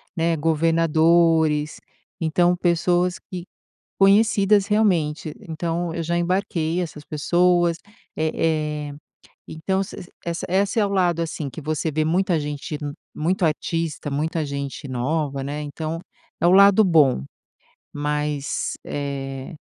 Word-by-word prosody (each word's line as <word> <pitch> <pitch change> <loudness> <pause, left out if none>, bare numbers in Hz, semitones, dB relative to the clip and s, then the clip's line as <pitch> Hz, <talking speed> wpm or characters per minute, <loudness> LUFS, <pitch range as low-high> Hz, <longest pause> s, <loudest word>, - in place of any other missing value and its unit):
né, 165 0 +1
governadores. 160 -1 +2 0.4
Então, 175 +2 +2
pessoas 175 +1 +1 0.2
que 180 -2 -5 0.6
conhecidas, 200 0 +4
realmente. 170 -8 +1
Então 165 +1 -3
eu 165 - -3
já 170 +2 -1
embarquei 175 -2 0
essas 150 -3 -6
pessoas. 175 +2 +2 0.4
Eh 155 -2 -1
eh, 145 - -8 0.6
então 190 +5 -2
ess 185 -2 -6 0.2
essa 170 0 -3
essa 195 +4 +1
é 205 - +3
o - - -2
lado, 175 -4 +1
assim, 155 -3 -4
que 160 - -8
você 155 +2 -2
vê 155 +1 0
muita 175 +1 +1
gente 145 0 -4 0.4
muito 175 +4 0
artista, 160 -1 -2
muita 155 +3 -1
gente 140 0 -5
nova, 135 +2 -1
né. 145 +2 -4
Então 155 +2 -4 0.4
é 170 - +3
o - - +6
lado 200 +2 +7
bom. 145 - +4 0.7
Mas, 150 -1 -2
eh, 135 +1 -5
165 Hz, 125 wpm, -23 LUFS, 150-175 Hz, 0.7 s, lado